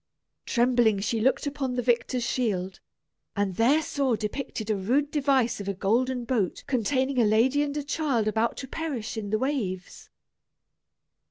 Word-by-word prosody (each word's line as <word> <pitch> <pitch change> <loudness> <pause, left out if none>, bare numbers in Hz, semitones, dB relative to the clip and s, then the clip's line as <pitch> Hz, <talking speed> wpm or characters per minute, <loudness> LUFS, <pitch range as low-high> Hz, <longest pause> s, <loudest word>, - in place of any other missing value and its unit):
Trembling, 240 -4 +3
she 215 +3 -1
looked 265 +5 +2
upon 275 -3 -2
the 245 - -1
victor's 240 +1 +1
shield, 190 -7 -1 0.6
and 200 -2 0
there 275 +8 +4
saw 275 -5 0
depicted 220 0 -4
a - - +2
rude 260 +10 0
device 270 -6 +1
of 200 - -6
a 200 - -2
golden 240 +6 0
boat 225 -7 -1
containing 260 +2 0
a - - +5
lady 230 +7 +3
and 290 0 -2
a 295 - -2
child 275 -7 0
about 220 +2 0
to 265 - -6
perish 265 -7 -4
in 215 -2 -4
the 215 - +1
waves. 215 -9 -3
240 Hz, 160 wpm, -27 LUFS, 215-270 Hz, 0.6 s, a